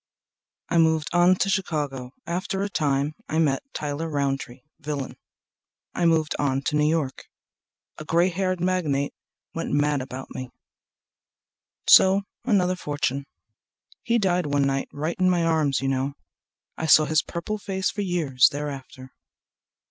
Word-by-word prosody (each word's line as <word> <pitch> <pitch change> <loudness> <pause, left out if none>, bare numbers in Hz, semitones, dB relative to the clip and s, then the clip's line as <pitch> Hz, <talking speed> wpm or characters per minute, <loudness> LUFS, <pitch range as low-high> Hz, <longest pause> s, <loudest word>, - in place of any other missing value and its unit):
I 170 - +2
moved 160 -1 +2
on 175 +1 +5
to 185 - 0
Chicago. 150 -10 -2
After 185 +3 -2
a 200 - -2
time 145 -3 0 0.2
met 155 -4 +1
Tyler 150 +2 -3
Rountree, 135 -4 -2 0.2
villain. 145 -2 -4 0.8
I 175 - 0
moved 160 -2 +2
on 135 -1 0
to 150 - -1
New 150 0 +3
York. 155 -5 -2 0.7
A 155 - -7
gray 170 +4 +3
haired 185 0 -1
magnate 165 -6 0 0.4
Went 165 - -4
mad 145 -1 +2
about 130 0 -8
me—so 190 +8 0 0.2
another 185 -6 +2
fortune. 145 -4 -2 0.7
He 235 -1 +1
died 180 -6 +1
one 145 -1 +1
night 135 0 -1
right 155 +4 -3
in 185 0 +4
my 175 -2 +2
arms, 155 -5 +1
you 135 - -1
know. 135 +1 -1 0.6
(I 160 - -2
saw 155 0 +7
his 155 0 +2
purple 195 +5 -5
face 190 -2 -2
for 205 - -4
years 160 -9 +3
thereafter. 135 -2 -7
155 Hz, 140 wpm, -25 LUFS, 140-180 Hz, 0.8 s, saw